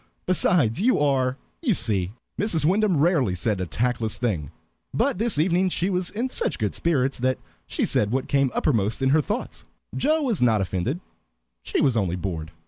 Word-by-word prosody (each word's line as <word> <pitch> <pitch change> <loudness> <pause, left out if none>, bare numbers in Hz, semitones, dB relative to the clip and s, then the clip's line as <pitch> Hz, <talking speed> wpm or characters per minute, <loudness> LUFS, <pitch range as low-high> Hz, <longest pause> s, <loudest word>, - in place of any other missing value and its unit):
Besides, 175 - +2
you 255 +4 +3
are, 135 -3 +1 0.2
you 245 - +2
see." 95 - 0 0.3
Mrs. 175 -7 +1
Wyndham 195 +1 +2
rarely 140 - +2
said 95 +1 -1
a 90 - -3
tactless 115 +1 -1
thing, 90 - -2 0.5
but - - +1
this 225 -6 0
evening 180 +4 +2
she 180 +2 0
was 180 -1 -1
in 235 +5 -2
such 260 - 0
good 105 -5 -1
spirits 135 -6 0
that 130 +1 +1 0.3
she - - -1
said 105 - +1
what 130 +4 -1
came 140 -1 +2
uppermost 110 -1 0
in 130 - +3
her 155 +3 +4
thoughts. 210 - -4 0.3
Joe 310 +2 +1
was 235 - 0
not 115 -4 +4
offended; 95 - -2 0.6
she - - -1
was 135 -5 +2
only 95 -6 0
bored. 85 -4 -4
135 Hz, 180 wpm, -24 LUFS, 110-180 Hz, 0.6 s, her